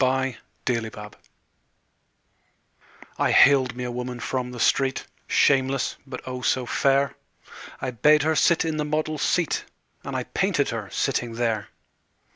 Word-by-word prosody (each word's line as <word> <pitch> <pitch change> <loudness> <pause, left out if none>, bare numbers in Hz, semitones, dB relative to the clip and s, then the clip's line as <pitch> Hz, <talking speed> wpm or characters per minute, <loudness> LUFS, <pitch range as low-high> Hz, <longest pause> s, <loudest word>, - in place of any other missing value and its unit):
My 130 -2 0 0.3
Madonna 110 -4 -3 2.1
I - - +2
haled 130 -3 +5
me 125 - -5
a 125 - -3
woman 125 0 -5
from 125 +1 -3
the 125 -1 -8
street, 135 +3 +1 0.2
Shameless, 135 -1 +2
but, 130 -1 -7
oh, 125 0 -5
so 125 +3 +1
fair! 140 +2 +1 0.6
I 130 - -3
bade 150 +5 +4
her 160 +1 +1
sit 165 +1 +3
in 160 -1 -2
the 150 - 0
model's 155 0 -2
seat 170 -4 0 0.4
And - - -5
I - - -1
painted - - 0
her - - -4
sitting 120 -1 -1
there. 115 -3 -1
130 Hz, 140 wpm, -24 LUFS, 125-140 Hz, 2.1 s, haled